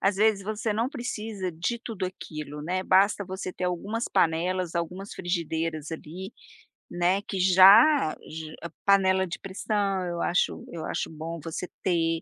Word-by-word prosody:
Às 195 0 +2
vezes, 210 -1 +3
você 215 +2 -2
não 230 +4 0
precisa 220 - -4
de 175 +9 -2
tudo 215 -6 -4
aquilo, 150 -5 -7
né. 185 +4 -1
Basta 195 +2 +4
você 190 0 -5
ter 180 - -4
algumas 200 +6 -2
panelas, 170 +2 +1
algumas 180 +4 -4
frigideiras 165 -3 -2
ali, 180 +6 -7 0.6
né, 175 +3 +2
que 200 -2 -5
já 190 - +7 0.2
j 155 0 -7 0.3
panela 190 -1 +4
de 180 - -6
pressão, 195 -1 -1
eu 170 -1 -3
acho 180 - 0
eu 160 -2 -5
acho - - -2
bom 160 +1 -6
você 165 +3 -5
ter, 165 -2 +1
185 Hz, 150 wpm, -27 LUFS, 165-200 Hz, 0.6 s, já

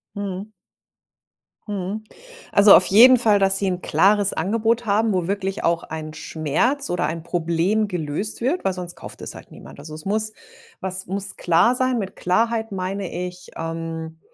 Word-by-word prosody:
Mhm. 200 +1 -5 1.2
Mhm, 205 +1 -4 0.5
also, 200 0 +8
auf 185 - +5
jeden 245 +6 +7
Fall, 215 -3 +3
dass 195 0 +5
Sie 200 - -1
'n 180 -2 -1
klares 200 0 +3
Angebot 225 +6 0
haben, 215 +1 +1
wo 180 -2 -1
wirklich 195 -1 -3
auch 170 0 +1
ein 155 -1 -7
Schmerz 160 - -1
oder 175 - 0
ein 160 0 -5
Problem 175 +6 0
gelöst 180 +3 -3
wird, 285 +9 0
weil 190 - 0
sonst 180 -1 -6
kauft - - -11
es - - -6
halt - - -13
niemand. - - -13
Also, 155 +1 -9
es 155 - -11
muss 215 +2 +1 0.5
was 190 -1 -3
muss 195 +1 -1
klar 175 +8 +3
sein. 255 -1 +1
Mit 195 -3 -4
Klarheit 225 +4 0
meine 190 0 -4
ich, 180 0 -6
ähm, 165 0 -5
195 Hz, 165 wpm, -22 LUFS, 170-215 Hz, 1.2 s, also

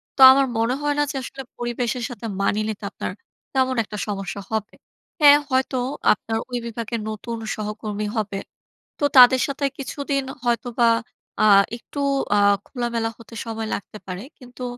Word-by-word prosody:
তো - - -21
আমার 275 +1 +4
মনে 230 +3 +1
হয় 290 0 0
না - - +4
যে, - - -9
আসলে 270 +1 -7 0.2
পরিবেশের 240 0 -2
সাথে 235 -2 -8 0.2
মানিয়ে 210 +2 +1
নিতে 215 -1 -6
আপনার - - -4 0.4
তেমন 260 -1 +2
একটা 210 0 -8
সমস্যা 200 -1 -4
হবে। 220 -1 -2 0.5
হ্যাঁ, 290 -1 +9
হয়তো 260 0 +1 0.4
আপনার 225 +1 -4
ওই 245 - -2
বিভাগের 230 0 -4
নতুন 230 +2 -5 0.2
সহকর্মী 210 0 -4
হবে। 210 -3 -2 0.6
তো 290 - +2
তাদের 255 0 +9
সাথে 280 0 -2
কিছুদিন 275 0 -2 0.2
হয়তোবা 240 0 +2 0.5
আ - - +6 0.3
একটু 285 +4 -9 0.4
আ - - +4 0.3
খোলামেলা 235 -3 -2
হতে 230 0 -15
সময় 225 -1 -4
লাগতে 210 - -8
পারে। 185 +2 -5 0.2
কিন্তু 250 -1 -10
235 Hz, 155 wpm, -23 LUFS, 215-260 Hz, 0.6 s, হ্যাঁ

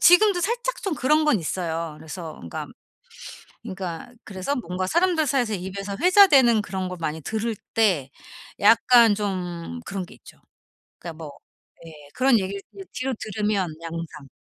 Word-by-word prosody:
지금도 355 +1 +6
살짝 485 +5 -2
좀 385 -5 -1
그런 305 +3 +2
건 300 -8 +3
있어요. 165 -2 -3
그래서 160 0 -8
그니까, 85 - -6 1.0
그니까 185 +2 -6
그래서 195 +8 -3
뭔가 185 -5 -3
사람들 340 - +2
사이에서 245 -5 +1
입에서 195 +2 -5
회자되는 295 - +6
그런 190 -2 -4
걸 180 -1 -7
많이 160 0 -3
들을 220 +6 -2 0.2
때 180 -12 +2 0.5
약간 230 +1 +6
좀 180 - -4
그런 190 -2 -4
게 - - -15
있죠. - - -17 0.6
그니까 170 -1 -7
뭐 155 -3 -8 0.5
예. 165 - -10 0.2
그런 255 -3 +4
얘기를 195 +1 -4
이제 390 - -9
뒤로 260 +1 -2
들으면 210 -3 -1 0.2
양상 165 -3 -7
200 Hz, 310 characters per minute, -24 LUFS, 175-265 Hz, 1.0 s, 지금도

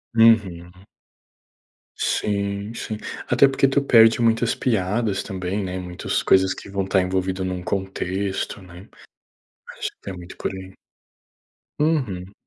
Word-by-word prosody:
Uhum. 100 -7 +4 1.3
Sim. 100 +1 -1
sim. 110 -2 -5 0.3
Até 125 +3 +5
porque 135 0 +2
tu 140 +1 +2
perde 115 -4 +6
muitas 115 0 +2
piadas 105 -2 0
também, 95 +1 -3
né, 95 0 -4
muitas 90 -1 -3
coisas 95 0 +4
que - - -11
vão 95 -1 -2
tá 95 0 +2
envolvido 95 0 -1
num 90 -1 -3
contexto, 95 +1 -3
né. 90 +1 -13 0.9
Acho - - -3
que - - -41
tem 100 - -6
muito 90 0 -11
por - - -3
aí. 95 0 -9 1.0
Uhum. 110 - 0
95 Hz, 130 wpm, -23 LUFS, 95-115 Hz, 1.3 s, perde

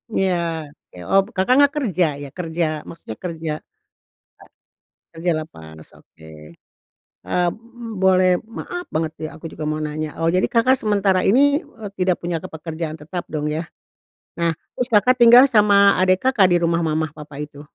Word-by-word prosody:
Iya 190 -1 +2 0.6
ke - - -16
oh 195 - +5
Kakak, 190 +6 +2
nggak 285 -1 +5
kerja 195 - +1 0.2
ya 140 - -8
kerja 170 -1 -2 0.2
maksudnya 140 -9 -9
kerja, 165 -3 -4
eee, - - -43 1.3
kerja 165 +2 -2
lepas 80 - -13 0.2
oke. 80 - -21 1.0
Eee, 180 0 +1 0.5
boleh 185 -1 +4 0.3
maaf 355 0 -6
banget 160 0 -1
ya 155 - -3
aku 165 - -13
juga 155 - -6
mau 155 0 -2
nanya, 155 +1 -3 0.2
oh 165 - +3
jadi 185 - +2
Kakak, 250 +3 +4
sementara 200 -3 +1
ini, 230 +7 +4 0.2
eee, 225 - -11
tidak 180 -1 +2
punya 170 -1 -2
ke - - -8
pekerjaan 160 0 -5
tetap 175 +3 -5
dong 150 -1 -2
ya, 160 - -2 0.8
nah 170 -1 +1 0.2
terus 250 0 -2
Kakak, 210 +4 +5
tinggal 240 +2 +9
sama 210 -6 +4 0.3
adik 185 0 +3
Kakak, 215 -8 +4
di 175 - +5
rumah 170 0 +1
mama 160 -1 0
papa 150 -1 -11
itu? 145 -1 -14
175 Hz, 160 wpm, -21 LUFS, 160-205 Hz, 1.3 s, tinggal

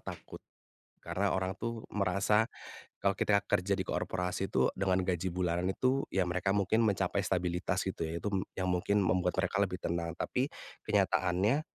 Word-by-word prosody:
takut. - - -9 0.6
Karena 100 +1 -1
orang 95 0 -1
tuh 115 -1 -5
merasa 100 +2 +2 0.5
kalau 100 0 +2
kita 100 +1 +3
kerja 95 +2 +1
di 95 - -2
korporasi 90 +1 -2
itu - - +2
dengan 95 -1 +1
gaji 90 0 0
bulanan 90 0 0
itu 130 +7 +1
ya 95 -1 +1
mereka 90 +2 -1
mungkin 100 +3 +2
mencapai 100 -2 +1
stabilitas 90 0 -1
gitu 95 - -4
ya. 85 - -3
Itu 105 +4 -3
m 95 - +2 0.2
yang 90 -1 +1
mungkin 95 +3 +1
membuat 90 -1 +1
mereka 100 - +1
lebih 95 -2 0
tenang. 85 0 -3
Tapi 130 +3 -1 0.3
kenyataannya, 95 +10 +2
95 Hz, 165 wpm, -32 LUFS, 90-100 Hz, 0.6 s, kita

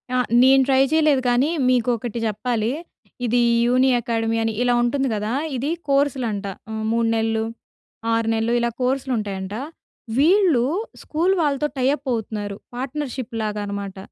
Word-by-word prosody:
ఆ! - - +3 0.3
నేను 265 +1 +6
ట్రై 265 0 +4
చేయలేదు. 305 -4 +3
కానీ, 250 +5 +2 0.2
మీకు 245 -1 +2
ఒకటి 235 0 -5
జెప్పాలి. 225 +1 -1 0.5
ఇది 240 +1 +2 0.3
యూని 255 +2 +3
అకాడమీ 225 0 -1
అని 225 -1 -1
ఇలా 245 -1 +3
ఉంటుంది 270 +3 0
గదా! 210 +3 -2 0.2
ఇది 280 +5 -2 0.2
కోర్సులంట. 255 -7 +1 0.2
హ్మ్. 220 0 -4
3 230 0 +1
నెల్లు, 225 0 0 0.7
6 225 0 +1
నెల్లు 225 +1 0
ఇలా 235 0 +1
కోర్సులు 265 +1 0
ఉంటాయంట. 195 -1 -4 0.6
వీళ్ళు 330 - +4 0.4
స్కూల్ 340 +5 +1
వాళ్ళతో 295 0 +1
టై 255 0 +2
అప్ 275 -1 -16
అవుతున్నారు. 210 -2 -4 0.2
పార్ట్నర్‌షిప్ 260 -2 -4
లాగా 210 -1 -2
అనమాట. 200 -1 -5
240 Hz, 145 wpm, -22 LUFS, 220-270 Hz, 0.7 s, నేను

